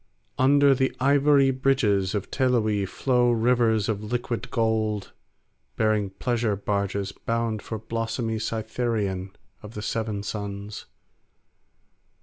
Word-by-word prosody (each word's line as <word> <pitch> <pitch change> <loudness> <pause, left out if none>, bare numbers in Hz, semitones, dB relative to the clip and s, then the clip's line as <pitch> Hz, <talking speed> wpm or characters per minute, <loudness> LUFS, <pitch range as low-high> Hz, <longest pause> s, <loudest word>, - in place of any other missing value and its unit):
Under 140 +1 +5
the 130 0 0
ivory 140 0 +4
bridges 115 -8 +1
of 100 - -4
Teloe 110 -6 +1
flow 125 +3 +1
rivers 115 -2 +2
of 110 -1 -2
liquid 120 +1 -3
gold 110 -3 -1 0.6
bearing 110 -2 +1
pleasure 115 +2 -1
barges 100 0 -2
bound 115 0 -2
for 110 - -5
blossomy 115 +1 -3
Cytharion 110 -4 -2 0.3
of 105 +1 -11
the 105 - -5
Seven 110 -3 -2
Suns. 100 0 -6
110 Hz, 110 wpm, -25 LUFS, 105-125 Hz, 0.6 s, Under